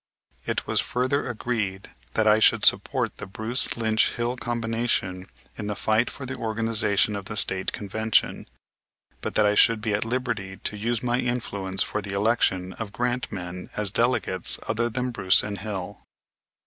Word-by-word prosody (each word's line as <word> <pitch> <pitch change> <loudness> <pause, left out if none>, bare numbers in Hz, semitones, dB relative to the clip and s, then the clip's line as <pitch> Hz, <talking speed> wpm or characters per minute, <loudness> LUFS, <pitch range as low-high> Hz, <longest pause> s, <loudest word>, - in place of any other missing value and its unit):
It - - -1
was - - +1
further 130 +2 -1
agreed 105 -5 -3 0.2
that 110 - +2
I 110 0 +5
should - - +4
support - - +2
the - - -7
Bruce 110 +6 +2
Lynch 110 -1 +2
Hill 120 +1 -1
combination 115 -6 -2 0.3
in 105 - -4
the 105 - -2
fight 110 +3 +1
for 140 - -8
the 130 - -4
organization 110 -2 +1
of 100 -1 -5
the 105 - -5
State 95 -1 +4
Convention, 110 +2 0 0.7
but - - -4
that 105 - +4
I 105 - +3
should 115 +1 +5
be 110 -1 -2
at 100 - 0
liberty 115 -5 -3
to - - -4
use 115 +3 -2
my 120 0 +1
influence 100 -6 -1
for 105 - -3
the 100 -1 -5
election 100 -3 +1
of 110 -3 -6
Grant 120 +3 -2
men 90 -1 -6
as 105 -2 0
delegates 115 -6 +2
other 115 +2 0
than 125 +2 -2
Bruce 95 -6 +4
and 100 -1 -5
Hill. 95 -4 -6
110 Hz, 170 wpm, -25 LUFS, 100-120 Hz, 0.7 s, I